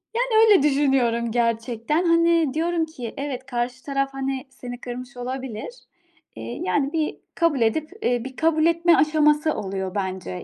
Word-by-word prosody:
Yani, - - +1 0.2
öyle 400 -9 +6
düşünüyorum 265 -5 +2
gerçekten. 235 +7 0
Hani, 335 -3 +3
diyorum 330 +1 0
ki: 250 -8 -8
Evet, 270 -2 -4
karşı 245 +1 -3
taraf 275 -1 -1
hani 270 0 -3
seni 245 -1 -8
kırmış 250 +1 -7
olabilir. 255 - -5 0.7
Eee, 115 +1 -7
yani 275 - 0
bir 315 -2 -1 0.2
kabul 330 -6 +1
edip, 290 +8 +1
eee, 245 -1 0
bir 265 -1 -8
kabul 320 -1 +2
etme 335 0 +4
aşaması 305 0 +3
oluyor 190 -1 -4
bence. 190 - -4
270 Hz, 150 wpm, -23 LUFS, 235-310 Hz, 0.7 s, öyle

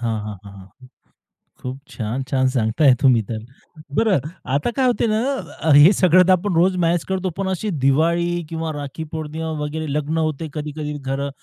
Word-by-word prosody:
हां, 105 - -4
हां, 105 -2 -6
हां, 100 - -11
हां. 100 +7 -16 0.7
खूप 130 +1 -6
छान. 120 +3 -4
छान 130 -1 +2
सांगताय 125 +3 +3
तुम्ही 125 -5 +5
तर. 110 - -3 0.6
बरं 210 -9 +3 0.3
आता 145 +12 +1
काय 260 - +3
होते 240 -1 +1
ना, 215 0 +1 0.6
हे 150 +6 +8
सगळं 185 0 +5
आपण 185 0 0
रोज 185 +3 +3
मॅनेज 170 0 +1
करतो. 190 0 -1
पण 195 - -1
अशी 190 +3 -2 0.2
दिवाळी 170 +4 +2
किंवा 160 -1 -3
राखी 145 +2 -6
पौर्णिमा 160 0 -4
वगैरे 155 +1 -4
लग्न 150 +2 -1
होते, 155 0 -2
कधी-कधी 150 0 -5
घरं 140 0 -3
155 Hz, 170 wpm, -21 LUFS, 135-175 Hz, 0.7 s, हे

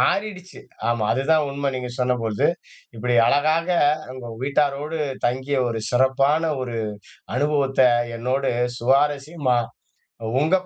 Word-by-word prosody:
மாறிடுச்சு. 195 -3 -1 0.3
ஆமா 120 -2 0
அது 135 - 0
தான் 155 -1 +4
உண்ம 140 0 -2
நீங்கச் 125 -1 -5
சொன்னபொழுது. 115 -4 +1 0.5
இப்படி 120 +2 -1
அழகாக 155 +4 +2 0.5
உங்க 125 -2 -8
வீட்டாரோடு 145 +2 0 0.3
தங்கிய 130 +3 -1
ஒரு 115 -1 -3
சிறப்பான 135 +5 +2
ஒரு 120 -2 -4 0.6
அனுபவத்த, 140 -2 +1 0.4
என்னோடு 130 +3 0 0.3
சுவாரசியமா, 140 +1 +1 0.8
உங்க 160 +5 +3
135 Hz, 105 wpm, -23 LUFS, 125-150 Hz, 0.8 s, தான்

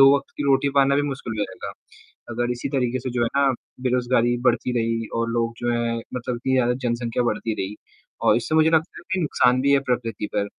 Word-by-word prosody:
दो 135 +1 +8
वक़्त 140 - -7
की - - -2
रोटी 140 0 +3
पाना 140 0 +4
भी 145 - +2
मुश्किल 135 -6 -4
हो 105 - +1
जाएगा। 95 -1 -8 0.6
अगर 120 +1 -1
इसी 125 +2 -3
तरीके 130 -2 0
से 130 0 -4
जो 120 -1 0
है 115 - +2
ना, 140 -1 +4 0.3
बेरोज़गारी 125 -1 +2
बढ़ती 125 0 +2
रही 115 0 -1
और 115 0 0
लोग 115 0 0
जो 120 0 -1
हैं 120 0 0 0.2
मतलब 125 0 -3
इतनी 130 +2 -2
ज़्यादा 125 -2 +3
जनसंख्या 120 0 -1
बढ़ती 115 -1 -1
रही 100 +1 -4 0.5
और - - +5
इससे 120 +6 -1
मुझे 160 0 +5
लगता 160 +1 +1
है - - -11
कि 190 - +1
नुकसान 125 -5 +3
भी 140 +1 +3
है 140 - +6
प्रकृति 115 -4 -1
पर, 100 - +1
125 Hz, 225 wpm, -23 LUFS, 115-135 Hz, 0.6 s, दो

